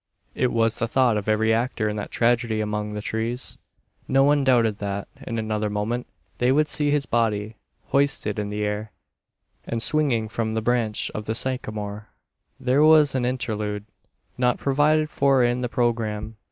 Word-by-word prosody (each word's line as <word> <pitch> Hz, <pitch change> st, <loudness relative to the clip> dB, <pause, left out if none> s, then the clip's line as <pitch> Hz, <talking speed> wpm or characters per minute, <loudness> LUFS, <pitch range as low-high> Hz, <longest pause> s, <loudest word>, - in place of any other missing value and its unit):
It 125 Hz, -, 0 dB
was 115 Hz, -1 st, +1 dB
the 115 Hz, -, 0 dB
thought 125 Hz, -1 st, +3 dB
of 105 Hz, 0 st, -2 dB
every 110 Hz, +1 st, +3 dB
actor 115 Hz, -1 st, 0 dB
in 105 Hz, -, -2 dB
that 105 Hz, -, -4 dB
tragedy 115 Hz, -2 st, +1 dB
among 105 Hz, 0 st, -2 dB
the 105 Hz, -, -5 dB
trees. 115 Hz, +3 st, -3 dB, 0.5 s
No 135 Hz, +1 st, +4 dB
one 145 Hz, 0 st, +3 dB
doubted 115 Hz, -5 st, +3 dB
that, 100 Hz, -1 st, -3 dB, 0.2 s
in 115 Hz, -, -3 dB
another 110 Hz, -1 st, -1 dB
moment, 105 Hz, +4 st, -2 dB, 0.3 s
they 125 Hz, +1 st, +3 dB
would 150 Hz, +3 st, +3 dB
see 150 Hz, -1 st, +1 dB
his 145 Hz, -1 st, +1 dB
body 110 Hz, -2 st, -1 dB, 0.3 s
hoisted 135 Hz, -7 st, +1 dB
into 105 Hz, -1 st, -3 dB
the 105 Hz, -, -1 dB
air, 105 Hz, 0 st, -3 dB, 0.7 s
and 115 Hz, -, -3 dB
swinging 125 Hz, -4 st, +1 dB
from 110 Hz, 0 st, -2 dB
the 110 Hz, -, 0 dB
branch 115 Hz, -3 st, 0 dB
of 105 Hz, -1 st, -6 dB
the 110 Hz, -, -1 dB
sycamore. 105 Hz, -5 st, -2 dB, 0.5 s
There 130 Hz, +2 st, +2 dB
was 155 Hz, -2 st, +6 dB
an 130 Hz, -2 st, 0 dB
interlude, 110 Hz, -4 st, -2 dB, 0.5 s
not 125 Hz, -1 st, +2 dB
provided 150 Hz, +3 st, +2 dB
for 135 Hz, -3 st, +3 dB
in 120 Hz, +1 st, +1 dB
the 125 Hz, -, -2 dB
programme. 115 Hz, -3 st, -1 dB
115 Hz, 170 wpm, -24 LUFS, 105-130 Hz, 0.7 s, was